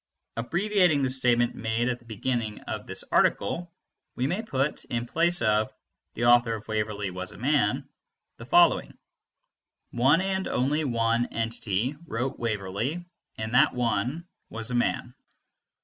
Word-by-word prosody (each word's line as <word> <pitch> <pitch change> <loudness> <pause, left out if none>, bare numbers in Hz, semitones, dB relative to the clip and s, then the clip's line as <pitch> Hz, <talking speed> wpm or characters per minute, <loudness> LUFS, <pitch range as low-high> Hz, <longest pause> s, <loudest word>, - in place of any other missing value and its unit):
Abbreviating 175 - +2
the 130 - +1
statement 120 -2 +3
made 110 +2 -1
at 125 -1 -1
the 120 - -23
beginning 115 -1 -3
of - - -6
this - - -2
article, 170 - +1 0.4
we 125 - -1
may 180 +10 -1
put, 140 - -1
in 120 0 -3
place 170 +3 +3
of 110 0 +2 0.4
"the 120 - -1
author 120 -1 +5
of 105 -1 -10
Waverley 105 -2 -2
was 95 0 -4
a - - -12
man," 125 -4 +1 0.5
the - - -10
following: - - +4 0.9
"One 135 +7 +4
and 190 0 -1
only 145 +5 0
one 115 -1 +1
entity 115 +2 -2
wrote 130 +3 -3
Waverley, 115 - -2 0.3
and 110 +1 -4
that 125 - +4
one 125 +6 -1 0.2
was 115 +1 -4
a - - -3
man." 120 0 0
120 Hz, 145 wpm, -27 LUFS, 110-140 Hz, 0.9 s, author